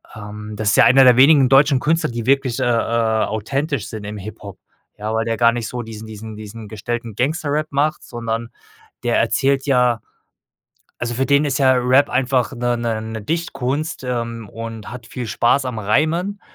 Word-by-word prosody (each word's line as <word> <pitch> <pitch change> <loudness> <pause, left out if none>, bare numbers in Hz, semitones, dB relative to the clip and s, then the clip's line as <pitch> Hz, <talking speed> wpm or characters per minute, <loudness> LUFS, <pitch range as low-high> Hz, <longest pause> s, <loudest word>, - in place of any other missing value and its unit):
Ähm. 105 0 -8
Das 105 -1 0
ist 100 - +3
ja - - +8
einer 135 +2 +7
der 125 -2 +7
wenigen 135 0 +6
deutschen 135 0 +5
Künstler, 160 +3 +1
die 115 0 -5
wirklich, 135 -2 +2
äh, - - 0
äh, 115 -2 +1
authentisch 130 +4 -2
sind 110 -2 -7
im 105 +1 -6
Hip-Hop. 100 -1 -9 0.4
Ja, 105 +1 -4
weil 110 0 0
der 115 -1 -1
gar 115 0 +5
nicht 115 -2 -3
so 125 +1 -4
diesen 110 -1 -9
diesen 110 0 -9
diesen 110 +1 -9
gestellten 115 +1 -5
Gangster-Rap 150 +3 -1
macht, 145 +2 0
sondern 115 -1 -4 0.5
der 120 -1 +1
erzählt 135 +4 +1
ja 125 -4 +2 1.0
also, 120 0 -2
für 135 +3 0
den 140 +1 +3
ist 140 -3 0
ja 130 -2 +4
Rap 130 +3 +3
einfach 125 -1 +1
'ne 120 0 -1
'ne 115 -2 -2
'ne 110 0 -6
Dichtkunst, 155 +1 -3
ähm, 115 -3 -4
und 115 -1 -7
hat 125 -3 -9
viel 125 -2 -6
Spaß 120 +4 +2
am 125 -3 -4
Reimen 160 - 0
120 Hz, 185 wpm, -20 LUFS, 110-135 Hz, 1.0 s, ja